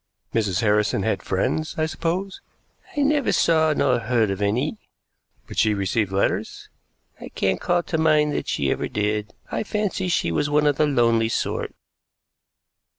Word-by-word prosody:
"Mrs. 105 Hz, -5 st, 0 dB
Harrison 105 Hz, -2 st, +2 dB
had 110 Hz, -, 0 dB
friends, 155 Hz, +11 st, -1 dB
I 155 Hz, -, +1 dB
suppose?" 175 Hz, +4 st, -3 dB, 0.6 s
"I -, -, +2 dB
never 285 Hz, -2 st, +2 dB
saw 160 Hz, -1 st, +3 dB
nor 145 Hz, -, +2 dB
heard 115 Hz, -2 st, +1 dB
of 95 Hz, +1 st, -4 dB
any." 125 Hz, -, 0 dB, 0.7 s
"But -, -, -5 dB
she 110 Hz, -1 st, +3 dB
received 100 Hz, +1 st, -1 dB
letters?" 95 Hz, +1 st, -1 dB, 0.5 s
"I -, -, -9 dB
can't 95 Hz, -1 st, -1 dB
call 175 Hz, -1 st, +1 dB
to 160 Hz, -, -2 dB
mind 150 Hz, -2 st, +3 dB
that -, -, -3 dB
she 70 Hz, -1 st, 0 dB
ever -, -, -1 dB
did. 105 Hz, 0 st, -2 dB, 0.2 s
I -, -, -1 dB
fancy 210 Hz, -3 st, -2 dB
she 165 Hz, -, 0 dB
was 145 Hz, -, 0 dB
one 150 Hz, 0 st, +2 dB
of 145 Hz, -1 st, +2 dB
the 155 Hz, -, +3 dB
lonely 115 Hz, -4 st, +2 dB
sort." -, -, -2 dB
125 Hz, 160 wpm, -23 LUFS, 105-160 Hz, 0.7 s, saw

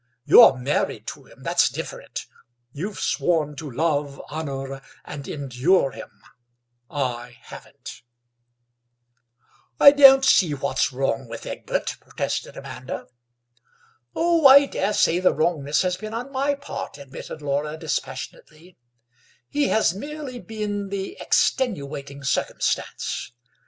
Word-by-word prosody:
You're 130 Hz, -, +8 dB
married 130 Hz, +4 st, -1 dB
to -, -, -11 dB
him—that's -, -, 0 dB
different; -, -, -7 dB, 0.5 s
you've 190 Hz, +10 st, -5 dB
sworn 155 Hz, -4 st, 0 dB
to 155 Hz, -1 st, -6 dB
love, 145 Hz, 0 st, -1 dB
honour, 135 Hz, -3 st, -5 dB, 0.2 s
and 140 Hz, -2 st, -8 dB
endure 140 Hz, +3 st, +1 dB
him: -, -, -10 dB, 0.8 s
I 125 Hz, -4 st, -4 dB
haven't." -, -, -12 dB, 1.8 s
"I 280 Hz, -, +10 dB
don't 270 Hz, -2 st, +8 dB
see 175 Hz, -, +4 dB
what's 135 Hz, 0 st, 0 dB
wrong 130 Hz, -1 st, -2 dB
with 115 Hz, 0 st, -8 dB
Egbert," -, -, -3 dB
protested -, -, -4 dB
Amanda. -, -, -7 dB, 1.1 s
"Oh, 335 Hz, -3 st, +4 dB
I 280 Hz, +1 st, +9 dB
daresay 195 Hz, -7 st, +1 dB
the 185 Hz, -, +3 dB
wrongness 150 Hz, -2 st, +1 dB
has 180 Hz, -1 st, -1 dB
been 215 Hz, +2 st, -7 dB
on 250 Hz, +4 st, -5 dB
my 280 Hz, +1 st, 0 dB
part," 280 Hz, -, -7 dB
admitted 140 Hz, +2 st, -9 dB
Laura 145 Hz, +2 st, -2 dB
dispassionately; 160 Hz, +2 st, -6 dB, 0.7 s
"he 290 Hz, -1 st, +1 dB
has 220 Hz, -6 st, +2 dB
merely 285 Hz, +3 st, -7 dB
been 210 Hz, -3 st, -4 dB
the 195 Hz, -, -4 dB
extenuating 140 Hz, -, -1 dB
circumstance. 140 Hz, -, -2 dB
160 Hz, 110 wpm, -23 LUFS, 140-220 Hz, 1.8 s, I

